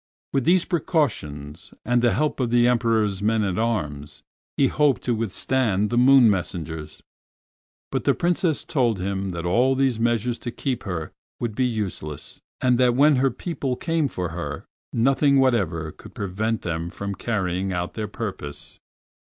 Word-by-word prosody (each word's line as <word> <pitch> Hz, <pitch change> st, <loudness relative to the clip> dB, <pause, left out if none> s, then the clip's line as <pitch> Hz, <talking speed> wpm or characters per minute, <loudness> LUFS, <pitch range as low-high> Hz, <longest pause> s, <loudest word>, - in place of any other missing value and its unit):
With 135 Hz, -3 st, +1 dB
these 175 Hz, +1 st, +4 dB
precautions, 90 Hz, -, -2 dB
and 120 Hz, 0 st, +2 dB
the 120 Hz, -3 st, +3 dB
help 155 Hz, +3 st, 0 dB
of 125 Hz, -3 st, 0 dB
the 120 Hz, 0 st, +4 dB
Emperor's 115 Hz, -5 st, +1 dB
men 110 Hz, +1 st, +2 dB
at 95 Hz, -1 st, -1 dB
arms, 75 Hz, -11 st, -2 dB, 0.3 s
he 140 Hz, -, +4 dB
hoped 145 Hz, 0 st, +2 dB
to 125 Hz, -, +1 dB
withstand 110 Hz, -1 st, 0 dB
the -, -, 0 dB
moon 130 Hz, 0 st, +7 dB
messengers, 85 Hz, -5 st, -3 dB, 0.9 s
but -, -, -2 dB
the -, -, +3 dB
Princess 170 Hz, -2 st, +1 dB
told 120 Hz, -7 st, +1 dB
him 95 Hz, +1 st, -2 dB
that 85 Hz, -1 st, -4 dB
all 125 Hz, +9 st, +3 dB
these 130 Hz, -4 st, +1 dB
measures 120 Hz, +1 st, 0 dB
to 120 Hz, -, -5 dB
keep 125 Hz, +1 st, -3 dB
her 90 Hz, -5 st, -4 dB, 0.3 s
would 120 Hz, -3 st, -2 dB
be 125 Hz, +4 st, +1 dB
useless, 100 Hz, -10 st, -4 dB, 0.2 s
and 125 Hz, -1 st, +3 dB
that 125 Hz, -1 st, +4 dB
when 145 Hz, +1 st, +5 dB
her 135 Hz, +1 st, +3 dB
people 135 Hz, -1 st, -3 dB
came 165 Hz, +1 st, 0 dB
for 90 Hz, -9 st, -4 dB
her 75 Hz, -4 st, -5 dB, 0.3 s
nothing 135 Hz, +3 st, +3 dB
whatever 90 Hz, -12 st, +1 dB
could -, -, -15 dB
prevent 105 Hz, +4 st, -2 dB
them 85 Hz, 0 st, -3 dB
from 100 Hz, +2 st, -5 dB
carrying 95 Hz, -3 st, -2 dB
out 90 Hz, -1 st, -3 dB
their 110 Hz, -1 st, -3 dB
purpose. 100 Hz, -9 st, -7 dB
115 Hz, 160 wpm, -24 LUFS, 95-130 Hz, 0.9 s, moon